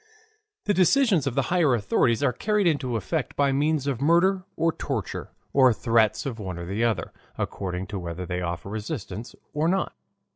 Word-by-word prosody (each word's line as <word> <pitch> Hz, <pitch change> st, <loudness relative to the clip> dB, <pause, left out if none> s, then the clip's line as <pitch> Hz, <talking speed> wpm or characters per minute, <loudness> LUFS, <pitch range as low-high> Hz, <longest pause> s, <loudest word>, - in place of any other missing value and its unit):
The 205 Hz, -, +2 dB
decisions 190 Hz, -, +4 dB
of 130 Hz, -, -2 dB
the 135 Hz, -, +2 dB
higher 160 Hz, -8 st, +4 dB
authorities 115 Hz, +3 st, +1 dB
are 125 Hz, -3 st, +3 dB
carried 210 Hz, -, +1 dB
into 145 Hz, -7 st, +1 dB
effect 140 Hz, -, -2 dB
by 140 Hz, -1 st, +3 dB
means 145 Hz, +1 st, +1 dB
of 135 Hz, -4 st, -2 dB
murder 180 Hz, +5 st, +3 dB
or 165 Hz, 0 st, +2 dB
torture, -, -, -4 dB, 0.2 s
or 130 Hz, -2 st, +6 dB
threats 115 Hz, -1 st, +2 dB
of 120 Hz, -5 st, -4 dB
one 95 Hz, -4 st, -5 dB
or 85 Hz, -, -5 dB
the 100 Hz, +6 st, -1 dB
other, 110 Hz, -7 st, 0 dB, 0.2 s
according 95 Hz, -1 st, -3 dB
to 100 Hz, -, -2 dB
whether 85 Hz, +1 st, -5 dB
they 90 Hz, 0 st, -3 dB
offer 85 Hz, +1 st, -4 dB
resistance 110 Hz, +1 st, -5 dB, 0.2 s
or 150 Hz, +2 st, +1 dB
not. 190 Hz, +2 st, 0 dB
130 Hz, 180 wpm, -26 LUFS, 105-160 Hz, 0.2 s, or